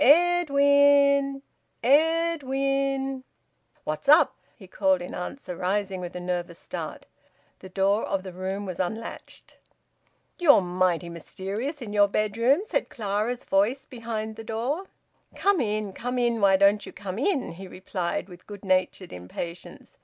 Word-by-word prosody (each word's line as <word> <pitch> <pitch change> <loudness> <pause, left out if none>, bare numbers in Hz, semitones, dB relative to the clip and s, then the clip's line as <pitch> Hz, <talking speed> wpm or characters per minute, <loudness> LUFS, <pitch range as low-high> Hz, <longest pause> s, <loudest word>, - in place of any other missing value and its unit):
"Ed 350 +3 +5
win! 280 -1 +4 0.4
Ed 325 +5 +3
win!" 270 0 -1 0.6
"What's 155 - -3
up?" 305 +3 +6 0.2
he 195 - -14
called 190 0 +1
in 175 - -7
answer, 180 +1 -6
rising 190 +1 -1
with 175 0 -7
a - - -3
nervous 175 -1 -3
start. - - -7 0.5
The 190 - -11
door 195 +3 +1
of 195 -1 -2
the 185 -2 -8
room 190 +2 -4
was 185 -3 -6
unlatched. 220 +5 -6 0.8
"You're 300 - +6
mighty 180 -1 0
mysterious 200 - -5
in 210 -3 -7
your 205 -1 +5
bedroom," 230 - +2
said 435 - -2
Clara's 215 +2 -2
voice 225 +8 +1
behind 225 -3 -5
the 225 - -7
door. 245 - -2 0.5
"Come 400 -5 +2
in! 210 -3 -2
Come 245 +4 -4
in! 235 -2 +1
Why 195 -1 +5
don't 200 +1 +4
you - - -9
come 195 +1 -6
in?" 285 - 0
he 190 +3 -9
replied, 185 -1 -4
with 180 -1 -14
good 205 -1 -10
natured 185 0 0
impatience. 130 - -8
215 Hz, 145 wpm, -26 LUFS, 185-275 Hz, 0.8 s, up